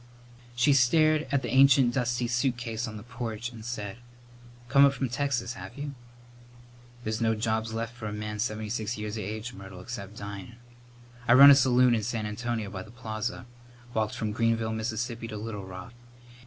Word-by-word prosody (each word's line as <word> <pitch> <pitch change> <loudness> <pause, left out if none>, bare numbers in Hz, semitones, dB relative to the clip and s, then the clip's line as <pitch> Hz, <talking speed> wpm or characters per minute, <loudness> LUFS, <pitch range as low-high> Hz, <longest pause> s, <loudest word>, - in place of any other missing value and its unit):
She 125 +4 +4
stared 155 +4 +4
at 140 -1 +1
the - - -3
ancient 135 -2 +6
dusty 120 -1 0
suitcase 120 -2 -1
on 110 -1 -7
the 105 - -9
porch 120 -1 -5
and 115 -2 -10
said, 105 -3 -5 0.7
"Come 140 +2 +6
up 140 -1 +6
from 135 -2 -2
Texas, 125 -2 -1
have 135 - -10
you?" 145 0 -5 1.1
"There's 110 +1 -2
no 110 -1 +2
jobs 110 +1 -1
lef 115 0 -3
for 120 -2 -7
a - - -4
man 105 0 -5
seventy 110 -1 -2
six 110 0 -2
years 105 0 -4
of 110 - -4
age, 110 +4 -5
Myrtle, 95 -3 -10
except 105 0 -7
dyin.' 100 +2 -7 0.7
I 120 - +6
run 140 +3 +11
a - - +9
saloon 125 -2 +4
in 115 - +1
San 110 0 -2
Antonio 110 -1 -3
by 95 -3 -5
the 110 - -11
Plaza. 110 0 -5 0.5
Walked 110 -1 0
from 110 -1 -2
Greenville, 115 0 +1
Mississippi, 115 +1 -3
to 110 -2 -6
Little 105 -2 -5
Rock. 95 +6 -9
115 Hz, 180 wpm, -28 LUFS, 110-125 Hz, 1.1 s, run